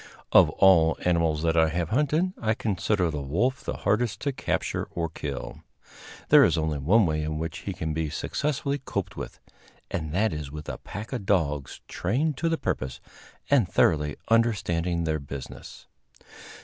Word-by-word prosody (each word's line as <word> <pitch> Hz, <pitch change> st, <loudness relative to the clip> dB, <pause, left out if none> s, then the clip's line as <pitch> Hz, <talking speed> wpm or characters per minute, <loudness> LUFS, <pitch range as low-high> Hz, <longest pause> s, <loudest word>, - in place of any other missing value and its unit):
Of -, -, +7 dB
all 85 Hz, -4 st, +5 dB
animals 85 Hz, -3 st, +2 dB
that 80 Hz, 0 st, +2 dB
I 80 Hz, -1 st, +4 dB
have 85 Hz, 0 st, -2 dB
hunted, 150 Hz, +8 st, +1 dB
I 110 Hz, -1 st, +1 dB
consider 95 Hz, -4 st, 0 dB
the 75 Hz, -2 st, -3 dB
wolf 115 Hz, -, 0 dB
the -, -, -4 dB
hardest 115 Hz, +1 st, 0 dB
to 140 Hz, -, 0 dB
capture 130 Hz, -, -2 dB
or 85 Hz, -1 st, -3 dB
kill. 70 Hz, -4 st, -6 dB, 0.7 s
There -, -, +8 dB
is -, -, +3 dB
only 80 Hz, -2 st, -1 dB
one 100 Hz, +10 st, +4 dB
way 75 Hz, -2 st, 0 dB
in 75 Hz, 0 st, -3 dB
which 80 Hz, 0 st, -4 dB
he 100 Hz, -, -5 dB
can 80 Hz, -2 st, -3 dB
be 80 Hz, -1 st, -1 dB
successfully 140 Hz, -, -2 dB
coped -, -, -4 dB
with, -, -, -7 dB, 0.5 s
and 80 Hz, -2 st, -3 dB
that 100 Hz, +3 st, +1 dB
is 75 Hz, -2 st, -5 dB
with 75 Hz, 0 st, -7 dB
a -, -, -5 dB
pack 105 Hz, +6 st, -8 dB
of 110 Hz, -6 st, -4 dB
dogs 75 Hz, -8 st, 0 dB
trained 135 Hz, -, -1 dB
to 165 Hz, -, 0 dB
the 165 Hz, -, +1 dB
purpose 65 Hz, -, -3 dB, 0.5 s
and 125 Hz, -10 st, +3 dB
thoroughly 75 Hz, -5 st, +2 dB
understanding 90 Hz, -7 st, +1 dB
their 80 Hz, -1 st, 0 dB
business. 70 Hz, -1 st, -9 dB
85 Hz, 170 wpm, -26 LUFS, 75-110 Hz, 0.7 s, There